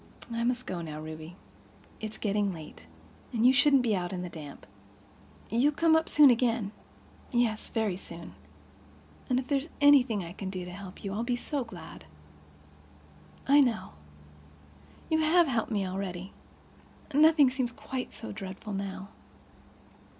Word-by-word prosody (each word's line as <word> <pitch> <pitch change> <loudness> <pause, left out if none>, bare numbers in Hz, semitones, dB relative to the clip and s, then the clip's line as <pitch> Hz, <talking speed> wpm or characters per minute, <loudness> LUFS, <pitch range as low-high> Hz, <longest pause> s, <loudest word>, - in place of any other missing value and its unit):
"I 230 0 -1
must 250 +1 0
go 180 -2 -4
now, 155 -2 -6
Ruby. 155 +2 -8 0.6
It's 215 0 -6
getting 205 -1 0
late—and 85 - -7
you 255 - +7
shouldn't 275 -1 +5
be 220 -4 +2
out 175 -1 -2
in 180 -1 -4
the 180 - -5
damp." 150 -4 -10 0.9
"You'll 260 +7 +3
come 320 +2 +4
up 320 0 +2
soon 290 -3 +7
again." 230 -4 +1 0.6
"Yes, 235 -3 0
very 215 -5 -1
soon. 170 -3 -10 1.0
And 250 - +2
if 255 - -6
there's 285 +2 0
anything 265 - +5
I 170 0 -8
can 195 -1 -5
do 185 -2 -5
to 180 - -8
help 190 0 -10
you 195 -1 -3
I'll 210 - -2
be 245 0 0
so 275 +2 -2
glad." 175 - -11 1.4
"I 285 +1 +7
know. 245 -5 0 1.2
You 315 - +3
have 330 +3 +5
helped 235 -6 -1
me 200 -3 0
already. 185 0 -5 0.8
Nothing 300 -2 +6
seems 255 -2 -1
quite 255 +1 -5
so 225 - -6
dreadful 195 +1 -7
now. 195 0 -5
220 Hz, 150 wpm, -29 LUFS, 185-260 Hz, 1.4 s, you